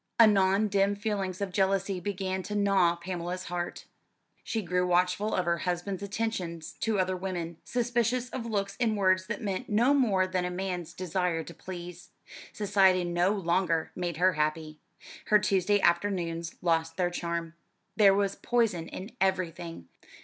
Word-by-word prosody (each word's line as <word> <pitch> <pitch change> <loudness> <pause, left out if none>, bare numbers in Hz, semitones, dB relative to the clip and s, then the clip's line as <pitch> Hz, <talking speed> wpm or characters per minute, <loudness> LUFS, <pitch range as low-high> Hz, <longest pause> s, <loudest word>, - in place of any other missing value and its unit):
Anon 205 -2 +5
dim 200 0 +2
feelings 200 -3 -3
of 200 -2 -2
jealousy 195 0 +1
began 190 -1 -3
to 210 +3 -5
gnaw 195 -4 +3
Pamela's 175 +1 -4
heart. 175 -1 -4 0.6
She 220 -2 -2
grew 180 0 0
watchful 180 +4 +1
of 185 - 0
her 170 0 +1
husband's 180 +3 -2
attentions 190 -6 -3
to 220 -2 0
other 185 0 +1
women, 175 -3 -4
suspicious 240 0 0
of 235 -3 -4
looks 200 -2 -2
and 225 -3 +1
words 185 0 +2
that 215 -1 -4
meant 200 +4 -3
no 235 +6 +4
more 210 -9 +3
than 185 -1 -1
a 180 - -1
man's 180 -2 -4
desire 180 -2 -1
to 170 - -10
please. 180 0 -9 0.4
Society 195 -3 +3
no 175 +1 +1
longer 175 -4 0
made 175 -3 -3
her 185 +2 +4
happy. 155 0 -2 0.5
Her 210 - +5
Tuesday 205 0 +2
afternoons 170 -2 0
lost 165 -1 +1
their 180 -1 +1
charm. 170 -1 -3 0.4
There 200 -3 +6
was 200 -1 +1
poison 220 -9 0
in 195 +6 -8
everything. 175 - -1
185 Hz, 155 wpm, -29 LUFS, 175-205 Hz, 0.6 s, There